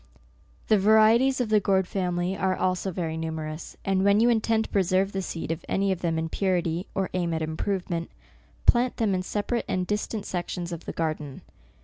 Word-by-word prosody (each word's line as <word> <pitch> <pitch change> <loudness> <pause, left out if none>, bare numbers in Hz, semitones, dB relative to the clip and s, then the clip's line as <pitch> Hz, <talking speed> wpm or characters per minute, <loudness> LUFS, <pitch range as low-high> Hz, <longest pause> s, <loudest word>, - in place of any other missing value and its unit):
The 215 - +4
varieties 220 +6 +5
of 245 -3 0
the 215 -1 +5
gourd 190 -2 +1
family 180 -1 -1
are 190 -1 0
also 185 +1 0
very 165 -3 -3
numerous, 160 -1 -5
and 190 -1 +2
when 200 +1 +4
you 235 +2 +5
intend 225 -1 +2
to - - -9
pre 200 - +3
serve 190 +2 +1
the 195 - -2
seed 165 -3 -4
of 165 +1 -4
any 195 0 +1
of 185 -2 -2
them 165 -2 0
in 160 0 -1
purity, 175 -1 -1
or 195 -1 -1
aim 175 -2 0
at 160 - -2
improvement, 170 +1 -2 0.6
plant 245 +1 +3
them 215 -4 +1
in 185 - 0
separate 210 +5 -2
and 185 -1 -1
distant 210 +1 -2
sections 175 -1 -4
of 170 -1 -6
the - - -4
garden. 155 -4 -3
185 Hz, 200 wpm, -26 LUFS, 170-205 Hz, 0.6 s, varieties